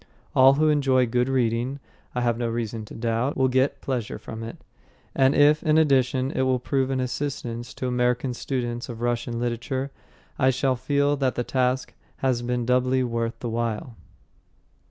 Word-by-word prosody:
All 135 +1 +7
who 155 +2 +3
enjoy 135 -4 +3
good 125 +2 0
reading, 125 +1 0 0.4
I 125 - 0
have 120 -1 +2
no 120 0 -2
reason 115 -1 -3
to - - -11
doubt, 115 +4 -1
will 130 0 +3
get 135 +2 +1
pleasure 125 -5 -3
from 110 0 -8
it, 115 0 -7 0.6
and 135 +1 +3
if, 150 +1 +5
in 155 -1 +3
addition, 135 -3 +2
it - - -1
will 130 -1 +2
prove 130 +1 0
of 135 -1 0
assistance 125 -2 -3
to - - -4
American 125 +1 0
students 120 -1 -3
of 115 -1 -7
Russian 120 0 -1
literature, 125 +3 -2 0.5
I 130 -2 +4
shall 130 0 +1
feel 140 +3 +1
that 135 -2 0
the 120 - -1
task 130 +1 0 0.2
has 130 -3 0
been 120 0 -1
doubly 130 +1 +2
worth 115 -1 -2
the 120 - -3
while. 115 +1 -3
125 Hz, 175 wpm, -25 LUFS, 120-135 Hz, 0.6 s, All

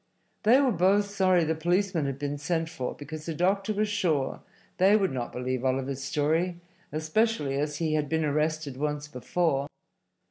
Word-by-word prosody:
They 235 +5 +6
were 270 -3 +3
both 200 +2 +2
sorry 185 -3 +3
the 160 0 +1
policemen 175 -1 0
had 135 -1 -3
been 145 0 -3
sent 165 +2 -1
for, 130 -6 -4
because 155 +2 -8
the 165 - -3
doctor 195 +5 +1
was 210 +1 0
sure 165 -10 0 0.4
they 195 +3 +6
would 195 -6 +1
not 125 -2 -3
believe 125 0 -3
Oliver's 135 +1 -1
story, 160 +5 0 0.3
especially 155 0 0
as 150 0 -1
he 160 -1 0
had 150 -2 0
been 160 0 +1
arrested 150 -2 -1
once 150 +1 -2
before. 140 +1 -1
155 Hz, 170 wpm, -28 LUFS, 145-185 Hz, 0.4 s, They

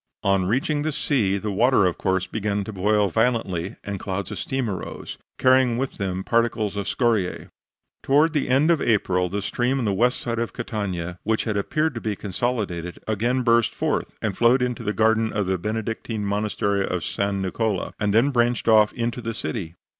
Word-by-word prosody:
On 95 -1 +2
reaching 135 +7 0
the 155 +1 -1
sea 110 -10 +1
the 105 +1 -3
water, 115 +1 +4
of 90 - 0
course, 95 -1 +1
began 105 -2 -2
to 110 - -7
boil 105 +1 +2
violently, 100 -4 0
and 100 -2 -4
clouds 95 0 -4
of - - -5
steam 130 -2 -2
arose, 95 -3 -6 0.2
carrying 130 -2 +4
with 135 +1 -3
them 95 -2 -2
particles 115 -3 +1
of 100 -1 -3
scoriae. 110 -7 0 0.5
Towards 150 +4 +3
the 145 -4 0
end 140 +6 +4
of 165 - +2
April 90 -5 +1
the 100 +2 -3
stream 125 +6 0
on 125 - -1
the 100 - +1
west 125 +6 +2
side 115 -1 -3
of 115 - -2
Catania, 95 -6 -4
which 110 +1 0
had 110 -3 -2
appeared 155 +10 0
to 120 - -5
be 110 -2 -2
consolidated, 95 -5 -3
again 120 +4 0
burst 115 -1 +3
forth, - - -2
and 105 -3 -1
flowed 120 +3 +4
into 125 -2 -2
the 105 - -1
garden 110 0 +2
of 105 -1 -1
the 95 0 -1
Benedictine 110 +1 -3
Monastery 100 -1 0
of 90 -3 -2
San 100 +4 -1
Niccola, 95 +1 -1
and 105 -1 +1
then 115 +7 +4
branched 120 -2 +1
off 110 -2 +6
into 120 +1 -2
the 115 -1 -4
city. 90 -7 -4
110 Hz, 190 wpm, -24 LUFS, 100-120 Hz, 0.5 s, off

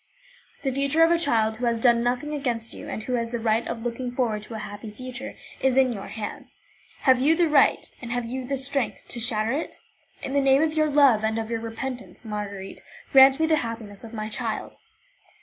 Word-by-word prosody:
The 270 - 0
future 280 +4 +2
of 330 - +5
a 340 - +3
child 220 -8 +1
who 245 - -2
has 235 -1 +1
done 235 0 +4
nothing 250 +5 -1
against 240 -6 -2
you, - - -9
and 215 - -4
who 255 - -3
has 230 -1 -1
the 240 - -1
right 225 0 +1
of 225 - -4
looking 245 +1 -3
forward 235 -4 -1
to 220 +2 -9
a - - -3
happy 205 +1 -7
future, 255 +4 -7 0.2
is 265 -1 +2
in 260 -2 +4
your 200 -3 -7
hands. 215 -2 -7 0.4
Have 260 -2 +5
you 305 +4 +4
the 345 0 +3
right, 295 -3 +4 0.2
have 245 -1 -3
you 255 +3 -4
the 275 +2 -2
strength, 270 -1 -2
to 240 - 0
shatter 225 -2 +1
it? 295 +5 -3 0.5
In 265 - -4
the 280 - +3
name 270 +2 +4
of 315 -1 0
your 310 -1 +2
love 275 -7 +5
and 220 +1 0
of 225 0 -3
your 230 - -1
repentance, 245 +2 -6
Marguerite, 205 -2 -6 0.3
grant 270 +1 +7
me 320 - +3
the 315 -1 +3
happiness 225 -5 -5
of 225 - -9
my 215 -2 -4
child." 215 - -4
245 Hz, 220 wpm, -25 LUFS, 225-270 Hz, 0.5 s, grant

